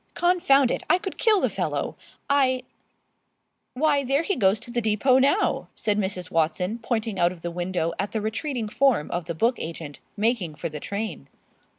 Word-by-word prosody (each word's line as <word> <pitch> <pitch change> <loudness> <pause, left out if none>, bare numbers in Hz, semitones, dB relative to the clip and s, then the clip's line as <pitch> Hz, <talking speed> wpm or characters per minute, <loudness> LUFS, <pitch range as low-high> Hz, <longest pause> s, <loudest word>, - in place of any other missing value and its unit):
Confound 280 -8 +4
it! - - -1
I 360 - +6
could 385 +1 -7
kill 430 -4 +4
the - - +3
fellow. - - -2 0.3
I 260 -2 +2 0.5
" - - -50
"Why, 290 +1 +2
there 275 +4 +1
he 395 +3 0
goes 195 -2 +3
to 240 - -9
the 240 0 0
depot 225 +4 +3
now," 285 +10 +2
said 210 -1 0
Mrs. 185 -3 -3
Watson, 180 +7 0
pointing 225 -3 -2
out 175 0 +4
of 175 -2 -12
the 175 - -3
window 175 -1 -2
at 200 - -2
the 220 - -1
retreating 225 +2 -3
form 245 - +2
of 175 -1 -2
the 170 0 -4
book 235 +9 +1
agent 160 -3 -6 0.2
making 210 -7 0
for 150 - -4
the 150 -1 -7
train. 200 -7 -5
220 Hz, 190 wpm, -25 LUFS, 180-270 Hz, 0.5 s, I